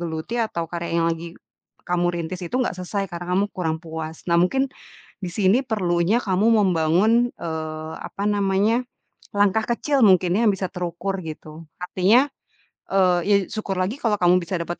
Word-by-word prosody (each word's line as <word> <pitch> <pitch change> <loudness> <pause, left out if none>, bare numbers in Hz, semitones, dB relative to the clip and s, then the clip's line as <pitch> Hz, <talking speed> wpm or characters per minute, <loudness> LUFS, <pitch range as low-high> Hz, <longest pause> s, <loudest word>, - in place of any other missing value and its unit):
geluti 165 +7 -4
atau 195 -7 -2
karya 170 -1 -3
yang - - +2
lagi 165 +1 -8 0.5
kamu 175 0 +1
rintis 170 +2 -5
itu - - -2
nggak 250 - 0
selesai 195 +2 -3
karena 175 +1 -3
kamu 200 - +3
kurang 160 -3 -1
puas. 160 -1 -7
Nah 170 - +3
mungkin, 265 +10 +2 0.6
di 180 - -2
sini 205 +6 +3
perlunya 185 -3 +1
kamu 195 +2 +1
membangun, 190 +6 +3
eee, 155 -1 -5
apa 200 - -6
namanya, 205 +4 +2 0.5
langkah 205 +2 +3
kecil 270 +4 0
mungkin 185 -2 +4
yang 230 -2 +4
bisa 190 -1 -2
terukur 180 +1 -3
gitu. 155 0 -9 0.2
Artinya, 195 +9 +3 0.6
eee, 185 -2 +3
ya 205 -1 +5
syukur 200 -3 -3
lagi 195 +9 -1
kalau 220 -3 +2
kamu 180 +1 +5
bisa 175 +2 -3
dapat 175 +1 -5
185 Hz, 160 wpm, -23 LUFS, 170-205 Hz, 0.6 s, ya